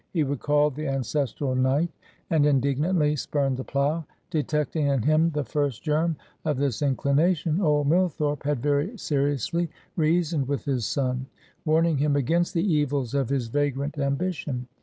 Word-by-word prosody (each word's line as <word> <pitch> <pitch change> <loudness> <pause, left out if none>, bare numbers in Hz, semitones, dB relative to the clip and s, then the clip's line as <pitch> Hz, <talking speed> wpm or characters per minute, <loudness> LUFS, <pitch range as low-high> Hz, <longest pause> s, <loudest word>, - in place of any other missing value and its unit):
He 165 -4 +1
recalled 145 +1 +1
the 155 +2 -4
ancestral 135 0 -1
Knight, 135 +6 +1 0.4
and 160 -3 +4
indignantly 150 +3 +2
spurned 140 -2 -1
the 130 - -4
plow. 145 +5 0 0.3
Detecting 150 -1 0
in 135 -5 +1
him 155 +4 +3
the 150 -2 -2
first 140 -1 -2
germ 160 +1 +1 0.3
of 150 -4 0
this 135 -3 -1
inclination, 150 +5 +1
old 150 -4 +2
Millthorpe 150 -3 +1
had 140 -4 -1
very 145 - 0
seriously 145 - 0 0.3
reasoned 160 -3 +1
with 140 0 -2
his 130 -6 0
son; 130 -1 -1 0.4
warning 160 -1 +3
him 145 0 +2
against 165 +7 +1
the 165 - +2
evils 145 - 0
of 140 -4 0
his 135 -4 0
vagrant 145 +2 -1
ambition. 140 -2 -2
145 Hz, 150 wpm, -26 LUFS, 140-155 Hz, 0.4 s, and